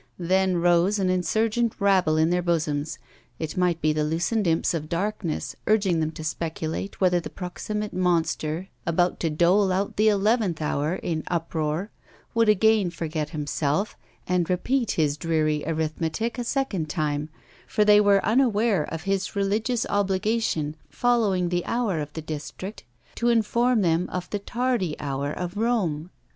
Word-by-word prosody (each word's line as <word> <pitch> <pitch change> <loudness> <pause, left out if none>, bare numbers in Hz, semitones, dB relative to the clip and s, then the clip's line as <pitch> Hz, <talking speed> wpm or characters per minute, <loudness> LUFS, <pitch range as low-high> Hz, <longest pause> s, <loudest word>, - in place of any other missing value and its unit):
Then 185 +1 +2
arose 175 +3 +3
an 185 -2 +1
insurgent 220 +5 +1
rabble 190 -6 +3
in 160 +2 +3
their 180 0 +2
bosoms, 155 -3 -1 0.4
it 160 -1 -4
might 180 -2 +1
be 155 0 +2
the 150 0 0
loosened 170 +7 0
imps 165 +1 +2
of 155 -2 -4
darkness, 180 -2 -2
urging 200 -6 +3
them 155 -1 0
to 155 - -7
speculate 160 +3 -4
whether 180 -2 +3
the 170 - -7
proximate 210 +3 -5
monster 170 -1 0 0.2
about 175 +2 +1
to 165 - 0
dole 180 +5 +3
out 195 +2 -1
the 215 +1 +4
eleventh 205 -3 +1
hour 150 +2 -1
in 160 -4 -2
uproar 165 +2 -2 0.4
would 230 -1 +3
again 215 -2 +4
forget 155 -2 -3
himself 150 +4 -1 0.3
and 180 -2 +1
repeat 235 +6 0
his 150 -2 +1
dreary 155 -2 0
arithmetic 160 +8 -2
a - - -1
second 230 - -1
time; 150 -1 -1 0.4
for 210 - +2
they 210 0 +7
were 200 -1 +4
unaware 220 - +2
of 165 0 -6
his 195 +1 -1
religious 215 +4 0
obligation, 195 -5 0
following 200 0 +1
the 175 0 0
hour 230 -8 0
of 150 -1 -4
the 160 - -6
district, 160 +6 -6 0.3
to 235 - 0
inform 235 0 +2
them 170 0 +1
of 180 -1 -4
the 205 - -1
tardy 235 -6 -1
hour 140 0 -2
of 180 +3 -5
Rome. 190 -9 0
180 Hz, 155 wpm, -25 LUFS, 160-210 Hz, 0.4 s, they